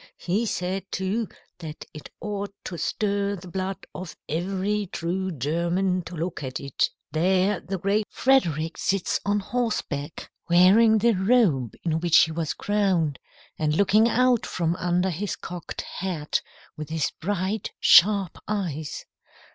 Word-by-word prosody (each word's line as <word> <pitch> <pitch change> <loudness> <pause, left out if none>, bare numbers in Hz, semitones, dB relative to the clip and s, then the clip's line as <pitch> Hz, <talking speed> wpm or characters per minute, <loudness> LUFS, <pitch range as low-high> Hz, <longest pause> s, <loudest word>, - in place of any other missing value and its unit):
He 205 +6 -1
said, 190 0 -3
too, 200 +4 -1 0.3
that 160 -3 -8
it 150 - -10
ought 205 -1 -4
to 180 - -5
stir 200 +2 -1
the 185 -1 -11
blood 190 +1 -4
of 185 -2 -8
every 195 +5 -1
true 180 +2 -2
German 170 +6 0
to 175 - -8
look 165 +1 -3
at 130 -1 -4
it. 140 -2 0 0.2
There 185 +4 +2
the 195 0 -4
great 200 +3 0
Frederick 165 - +1
sits 195 -2 0
on 205 0 +2
horseback, 195 - -3 0.2
wearing 200 +6 +6
the 230 +2 +3
robe 190 - +2
in 160 -2 0
which 170 -1 +4
he 160 - -1
was 160 -1 -2
crowned, 190 -9 +1 0.4
and 155 -1 +1
looking 210 +5 +4
out 250 0 +3
from 170 -1 -1
under 180 +1 +1
his 190 +5 -3
cocked 175 -1 -6
hat 175 -6 -3 0.3
with 155 0 -7
his 160 -2 -1
bright, 195 +3 -1
sharp 195 0 +5
eyes. 165 -8 -3
185 Hz, 140 wpm, -25 LUFS, 165-205 Hz, 0.4 s, wearing